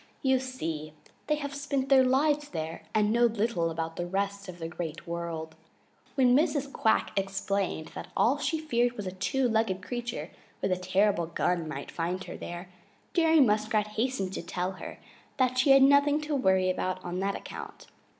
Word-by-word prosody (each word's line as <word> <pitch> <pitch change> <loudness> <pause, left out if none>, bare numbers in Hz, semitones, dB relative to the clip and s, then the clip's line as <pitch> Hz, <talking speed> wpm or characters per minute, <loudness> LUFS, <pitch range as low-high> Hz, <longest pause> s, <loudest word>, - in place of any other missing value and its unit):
You 265 -1 +4
see, 160 -13 -5 0.3
they 300 - +3
have 285 -1 -5
spent 280 -1 -2
their 270 -1 +7
lives 290 +3 +2
there 160 -1 -4
and 210 0 +2
know 240 +1 +5
little 220 -6 0
about 165 0 -4
the 175 - -2
rest 200 +1 -2
of 175 - -8
the 165 -1 -5
Great 165 -1 -6
World. 170 -2 -4 0.6
When 250 -2 +5
Mrs. 280 -1 +1
Quack 225 -6 +2
explained 195 -3 -1
that - - -7
all 270 +5 +3
she 320 +2 0
feared 245 -6 +1
was 210 -4 -6
that 185 - -4
a - - -17
two 265 +6 +1
legged 220 -5 0
creature 235 -9 -4 0.3
with 195 - -1
a - - +3
terrible 185 -1 +1
gun 170 0 0
might 140 -2 -6
find 180 +3 -2
her - - -8
there, 175 +1 -7 0.4
Jerry 325 -3 +5
Muskrat 215 -2 +2
hastened 215 -3 -1
to - - -3
tell 180 +2 -3
her 185 - -8 0.4
that 255 -1 +2
she 265 - +3
had 270 0 +8
nothing 285 +2 +5
to 300 -1 -2
worry 190 -7 +3
about 185 0 -3
on 175 +1 -3
that 195 +1 0
account. - - -8
205 Hz, 185 wpm, -29 LUFS, 175-265 Hz, 0.6 s, had